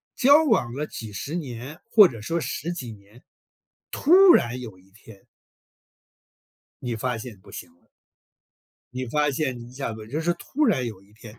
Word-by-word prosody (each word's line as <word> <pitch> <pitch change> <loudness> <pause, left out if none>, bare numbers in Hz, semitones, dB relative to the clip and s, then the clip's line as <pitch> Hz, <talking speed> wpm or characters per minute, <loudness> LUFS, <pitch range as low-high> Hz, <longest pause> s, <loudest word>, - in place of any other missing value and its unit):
交 285 +5 +6
往 225 - +1
了 145 +4 -3
几 110 -2 -8
十 120 - -6
年 135 -2 -7
或 210 -4 +8
者 115 -7 -9
说 165 +9 -2
10 165 +2 -4
几 130 -9 -6
年， 105 +4 -19 0.7
突 305 - +2 0.2
然 120 +2 +1
有 110 -6 -9
一 95 +1 -25
天 105 0 -17 1.6
你 120 -2 -3
发 125 +2 -2
现 110 -2 -9
不 - - -17
行 - - -9
了。 - - -34 1.1
你 130 0 -4
发 150 +4 +1
现 135 -3 -2
你 120 0 -11
一 - - -16
下 130 -3 -4
子 110 -1 -10
就 145 +7 -3
是 170 +1 +1
突 300 - -2
然 150 - +1
有 110 -5 -8
一 100 +1 -24
天 110 +1 -14
125 Hz, 190 characters per minute, -24 LUFS, 110-155 Hz, 1.6 s, 或